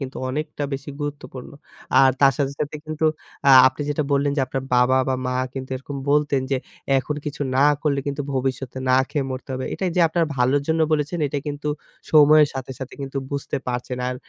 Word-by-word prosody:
কিন্তু 135 Hz, -1 st, -6 dB
অনেকটা 150 Hz, +2 st, -4 dB
বেশি 140 Hz, +2 st, -5 dB
গুরুত্বপূর্ণ। 145 Hz, -3 st, -6 dB, 0.5 s
আর 135 Hz, -1 st, +6 dB
তার 135 Hz, -1 st, +6 dB
সাথে, 140 Hz, -1 st, 0 dB
সাথে 150 Hz, +1 st, -2 dB
কিন্তু 155 Hz, 0 st, -1 dB, 0.4 s
আ -, -, +8 dB, 0.2 s
আপনি 130 Hz, +3 st, -6 dB
যেটা 145 Hz, -, 0 dB
বললেন 140 Hz, 0 st, +2 dB
যে 140 Hz, -, +2 dB
আপনার 135 Hz, 0 st, -3 dB
বাবা 130 Hz, +1 st, +4 dB
বা 130 Hz, -, +1 dB
মা 125 Hz, -, -1 dB, 0.2 s
কিন্তু 130 Hz, 0 st, -6 dB
এরকম 140 Hz, +2 st, -7 dB
বলতেন 145 Hz, -2 st, +2 dB
যে, 135 Hz, -, +2 dB, 0.4 s
এখন 150 Hz, +3 st, -3 dB
কিছু 150 Hz, -1 st, -4 dB
না 140 Hz, -, +5 dB, 0.2 s
করলে 140 Hz, -3 st, +1 dB
কিন্তু 140 Hz, +1 st, -2 dB
ভবিষ্যৎ 130 Hz, -1 st, -2 dB, 0.2 s
না 130 Hz, -, +5 dB
খেয়ে 145 Hz, -3 st, -1 dB
মরতে 130 Hz, +1 st, -6 dB
হবে। 130 Hz, -, -4 dB
এটা 190 Hz, -, -4 dB
এই 170 Hz, -, -4 dB
যে -, -, +4 dB
আপনার 165 Hz, +1 st, +1 dB
ভালোর 130 Hz, +3 st, +2 dB
জন্য 160 Hz, 0 st, +1 dB
বলেছেন 150 Hz, +3 st, 0 dB
এটা 145 Hz, -, -2 dB
কিন্তু 145 Hz, 0 st, -4 dB, 0.4 s
সময়ের 150 Hz, -1 st, +7 dB
সাথে, 130 Hz, 0 st, -5 dB
সাথে 130 Hz, 0 st, -7 dB
কিন্তু 135 Hz, 0 st, -4 dB
বুঝতে 140 Hz, -1 st, -3 dB
পারছেন। 125 Hz, +1 st, -3 dB
আর 125 Hz, -, -3 dB
140 Hz, 200 wpm, -22 LUFS, 130-150 Hz, 0.5 s, আ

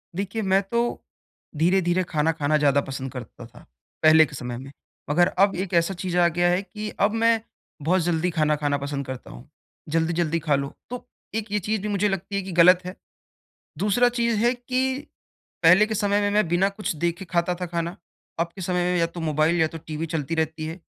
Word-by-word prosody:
देखिए 200 Hz, +4 st, -3 dB
मैं 195 Hz, -1 st, +3 dB
तो 235 Hz, -, +2 dB, 0.8 s
धीरे-धीरे 175 Hz, +2 st, +2 dB
खाना 155 Hz, 0 st, +1 dB
खाना 155 Hz, -1 st, +1 dB
ज़्यादा 140 Hz, -1 st, +3 dB
पसंद 135 Hz, -1 st, -6 dB
करता 120 Hz, -1 st, -9 dB
था 120 Hz, +1 st, -16 dB, 0.4 s
पहले 155 Hz, 0 st, +7 dB
के 150 Hz, -, -10 dB
समय 125 Hz, -2 st, -5 dB
में। 135 Hz, +2 st, -9 dB, 0.4 s
मगर 175 Hz, +4 st, +4 dB, 0.2 s
अब 200 Hz, -, +2 dB
एक 195 Hz, -, -8 dB
ऐसा 170 Hz, +2 st, +2 dB
चीज़ 180 Hz, -1 st, -3 dB
आ 175 Hz, -1 st, +5 dB
गया 175 Hz, +1 st, +1 dB
है 180 Hz, +2 st, +2 dB
कि 210 Hz, +3 st, -6 dB, 0.2 s
अब 205 Hz, -, +1 dB
मैं 230 Hz, -1 st, +4 dB, 0.4 s
बहुत 180 Hz, +5 st, +2 dB
जल्दी 170 Hz, +1 st, 0 dB
खाना 155 Hz, -1 st, +2 dB
खाना 145 Hz, -1 st, 0 dB
पसंद 140 Hz, 0 st, -4 dB
करता 130 Hz, -1 st, -8 dB
हूँ। -, -, -13 dB, 0.4 s
जल्दी-जल्दी 165 Hz, +1 st, 0 dB
खा 150 Hz, -2 st, +1 dB
लो 140 Hz, 0 st, -3 dB, 0.2 s
तो 250 Hz, 0 st, -6 dB, 0.3 s
एक 220 Hz, -2 st, -3 dB
ये 210 Hz, -, +1 dB
चीज़ 210 Hz, +1 st, -2 dB
भी 210 Hz, -, -3 dB
मुझे 205 Hz, 0 st, +1 dB
लगती 195 Hz, +1 st, -4 dB
है 200 Hz, -, 0 dB
कि 190 Hz, 0 st, -7 dB
गलत 180 Hz, +1 st, +7 dB
है। 180 Hz, +1 st, -6 dB, 0.8 s
दूसरा 210 Hz, +5 st, +3 dB
चीज़ 235 Hz, -2 st, +2 dB
है 240 Hz, -, +4 dB
कि 255 Hz, +2 st, -1 dB, 0.6 s
पहले 180 Hz, +6 st, +7 dB
के 220 Hz, -, -3 dB
समय 205 Hz, -1 st, +1 dB
में 205 Hz, 0 st, +1 dB
मैं 210 Hz, -1 st, +2 dB
बिना 175 Hz, +3 st, +2 dB
कुछ 200 Hz, -2 st, -4 dB
देखे 170 Hz, +4 st, -2 dB
खाता 175 Hz, 0 st, 0 dB
था 180 Hz, -, -2 dB
खाना, 170 Hz, +1 st, -3 dB, 0.4 s
अब 170 Hz, -, +1 dB
के 195 Hz, -, -9 dB
समय 180 Hz, 0 st, 0 dB
में -, -, +1 dB
या 165 Hz, -, +3 dB
तो 170 Hz, +1 st, -9 dB
मोबाइल 160 Hz, +2 st, +1 dB
या 160 Hz, -, +4 dB
तो 165 Hz, -, -8 dB
टीवी 155 Hz, +1 st, -5 dB
चलती 160 Hz, 0 st, -3 dB
रहती 160 Hz, 0 st, -2 dB
है। 165 Hz, +3 st, -7 dB
175 Hz, 210 wpm, -24 LUFS, 155-195 Hz, 0.8 s, पहले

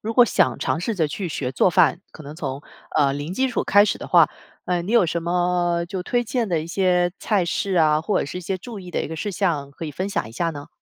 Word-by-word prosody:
如 225 Hz, +1 st, -4 dB
果 245 Hz, -, +7 dB
想 -, -, +1 dB
尝 165 Hz, -, -1 dB
试 225 Hz, +4 st, -2 dB
着 160 Hz, -5 st, +1 dB
去 180 Hz, +3 st, -4 dB
学 135 Hz, -4 st, -3 dB
做 155 Hz, -, +3 dB
饭， 175 Hz, -1 st, +3 dB
可 155 Hz, -, -12 dB
能 145 Hz, +2 st, -9 dB
从 140 Hz, -3 st, -5 dB, 0.3 s
呃 140 Hz, -2 st, +4 dB
零 145 Hz, +6 st, -4 dB
基 265 Hz, +3 st, +1 dB
础 245 Hz, -, -1 dB
开 205 Hz, +1 st, +6 dB
始 -, -, -1 dB
的 -, -, -7 dB
话， -, -, +5 dB, 0.3 s
呃， 180 Hz, -1 st, 0 dB
你 195 Hz, +7 st, -4 dB
有 235 Hz, -6 st, +5 dB
什 170 Hz, 0 st, -2 dB
么 175 Hz, 0 st, +1 dB
就 185 Hz, -1 st, -4 dB
推 240 Hz, +4 st, 0 dB
荐 230 Hz, -2 st, -1 dB
的 170 Hz, -3 st, +1 dB
一 160 Hz, -, -6 dB
些 180 Hz, -1 st, +1 dB
菜 200 Hz, -5 st, +1 dB
式 190 Hz, +3 st, -1 dB
啊？ 155 Hz, -2 st, +4 dB
或 185 Hz, +6 st, 0 dB
者 -, -, 0 dB
是 165 Hz, +6 st, -6 dB
一 -, -, -6 dB
些 185 Hz, +2 st, -3 dB
注 210 Hz, +2 st, -9 dB
意 180 Hz, -1 st, -10 dB
的 -, -, -1 dB
一 -, -, -3 dB
个 160 Hz, -, -5 dB
事 205 Hz, +6 st, -3 dB
项 165 Hz, -7 st, -1 dB
可 165 Hz, -, -8 dB
以 150 Hz, -, -4 dB
分 185 Hz, +7 st, -3 dB
享 200 Hz, -, -2 dB
一 110 Hz, -, -11 dB
下 165 Hz, +7 st, -1 dB
呢？ 145 Hz, -2 st, -9 dB
175 Hz, 300 characters per minute, -22 LUFS, 155-195 Hz, 0.3 s, 果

